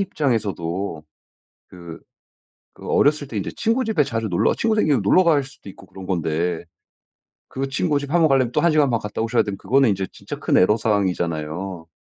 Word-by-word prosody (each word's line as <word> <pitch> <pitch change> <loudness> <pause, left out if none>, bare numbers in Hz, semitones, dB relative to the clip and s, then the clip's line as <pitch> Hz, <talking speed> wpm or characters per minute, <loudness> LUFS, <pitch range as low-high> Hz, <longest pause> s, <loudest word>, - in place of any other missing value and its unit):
입장에서도 100 - -2 0.6
그 85 -2 -11 0.7
그 - - -12
어렸을 145 -1 +2
때 120 - -9
인제 100 - -3
친구 230 +4 +1
집에 220 -9 +1
자주 115 -4 -3
놀러 85 - +2
친구 225 -1 0
생기면 145 - +2
놀러 180 - +4
갈 150 -4 +3
수도 135 -5 -15
있고 100 - -12
그런 95 -1 -11
건데 85 -1 -1 0.9
그 135 +1 -4
친구 145 +2 0
집 140 0 -6
1 175 - +3
번 160 - +5
가려면 130 -4 +2
또 - - +1
1 170 - +3
시간 150 -2 +3
반 115 - 0
갔다 105 +1 -5
오셔야 115 +1 +2
되면 100 -2 -5
그거는 130 +3 +2
이제 95 -1 -1
진짜 - - -8
큰 - - +1
애로 105 +4 +4
사항이잖아요. 90 -4 -2
110 Hz, 360 characters per minute, -21 LUFS, 95-145 Hz, 0.9 s, 번